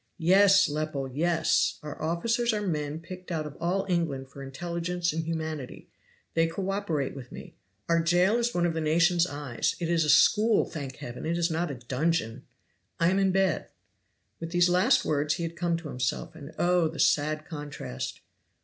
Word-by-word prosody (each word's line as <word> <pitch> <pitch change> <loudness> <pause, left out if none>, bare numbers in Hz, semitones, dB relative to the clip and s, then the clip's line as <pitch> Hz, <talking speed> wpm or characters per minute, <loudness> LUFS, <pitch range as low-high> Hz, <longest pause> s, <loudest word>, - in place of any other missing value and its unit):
"Yes, 195 +3 +5
Lepel, 150 -2 -3
yes! 165 +3 +1
Our 150 -1 -7
officers 225 +9 0
are 210 -1 -2
men 150 -3 -2
picked 180 +2 -9
out 155 -2 -2
of 150 - -8
all 180 +4 0
England 155 -7 -1
for 140 - -10
intelligence 170 +5 -3
and 165 0 -2
humanity. 160 -4 -5 0.4
They 165 0 +3
co 190 +4 -3
operate 165 -10 -2
with 130 -3 -10
me. - - -10 0.3
Our 165 0 +3
jail 175 +6 +3
is 240 0 0
one 175 -5 +1
of 170 - +1
the 160 - -2
nation's 170 +3 +3
eyes 145 -6 -2
it 170 -2 -2
is 170 -1 +3
a 150 - -1
school, 215 +8 +5
thank 140 -5 -6
Heaven, 120 +5 -7
it 170 +1 0
is 170 0 +1
not 170 +2 -1
a 140 - -4
dungeon! 125 0 -2 0.5
I 170 +2 +4
am 190 - +2
in 195 -1 +3
bed!" 195 0 +1 0.7
With 165 - -5
these 175 +1 +3
last 180 +1 +3
words 150 +1 +1
he 170 - -4
had 165 0 -4
come 170 0 0
to 165 -2 -8
himself, 125 -1 -2
and 155 -1 -10
oh, 175 -1 +3
the 160 +1 -7
sad 155 +1 +2
contrast! 145 - -6
165 Hz, 185 wpm, -28 LUFS, 150-175 Hz, 0.7 s, Yes